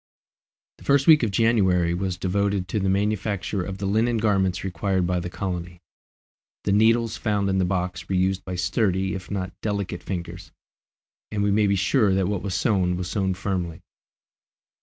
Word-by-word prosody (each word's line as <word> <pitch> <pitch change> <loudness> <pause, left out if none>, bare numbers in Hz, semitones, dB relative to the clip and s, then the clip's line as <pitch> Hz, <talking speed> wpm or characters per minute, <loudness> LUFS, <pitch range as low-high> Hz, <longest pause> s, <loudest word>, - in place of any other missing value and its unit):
The - - -14
first 140 -1 +3
week 155 -2 +7
of 115 - +1
January 95 -6 +2
was 90 0 -2
devoted 100 0 0
to 105 - -1
the 95 -1 0
manufacture 100 -1 -1
of 95 +1 -5
the 100 - -4
linen 115 +4 +1
garments 95 -4 +1
required 95 0 -1
by 90 0 0
the 90 +1 -5
colony. 90 -2 -5 0.8
The 100 - 0
needles 115 +2 +3
found 105 -3 0
in 95 - +1
the 95 - +2
box 90 -1 -3
were 95 - 0
used 95 0 +1
by 90 - -5
sturdy 95 +1 0
if 95 -3 -7
not 95 -2 -3
delicate 100 -4 -3
fingers, 90 -3 -6 0.8
and 105 -1 -1
we 100 - +2
may 105 +1 +3
be 100 - +2
sure 100 +1 +2
that 95 -2 +1
what 100 -3 -2
was 95 -3 -3
sewn 90 -2 +1
was 90 -1 -4
sewn 95 -2 0
firmly. 90 -3 -3
95 Hz, 180 wpm, -24 LUFS, 90-105 Hz, 0.8 s, week